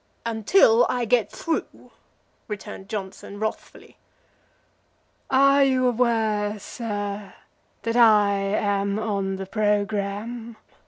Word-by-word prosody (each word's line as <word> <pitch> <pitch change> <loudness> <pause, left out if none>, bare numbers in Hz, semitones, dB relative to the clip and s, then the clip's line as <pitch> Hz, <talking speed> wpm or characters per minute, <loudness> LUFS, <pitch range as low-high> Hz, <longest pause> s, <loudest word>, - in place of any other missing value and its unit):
"Until 230 - +4
I 245 -1 0
get 225 -2 +1
through," 330 - -4 0.6
returned 200 -2 -8
Johnson, 200 -1 -6
wrathfully. 220 0 -6 1.3
"Are 275 +1 +5
you 260 -2 +2
aware, 220 -4 +1
sir, 205 -2 -5 0.5
that 230 0 -2
I 215 -4 +5
am 200 0 0
on 200 -3 -2
the 190 0 -6
programme?" 210 +2 -2
215 Hz, 95 wpm, -24 LUFS, 200-235 Hz, 1.3 s, Are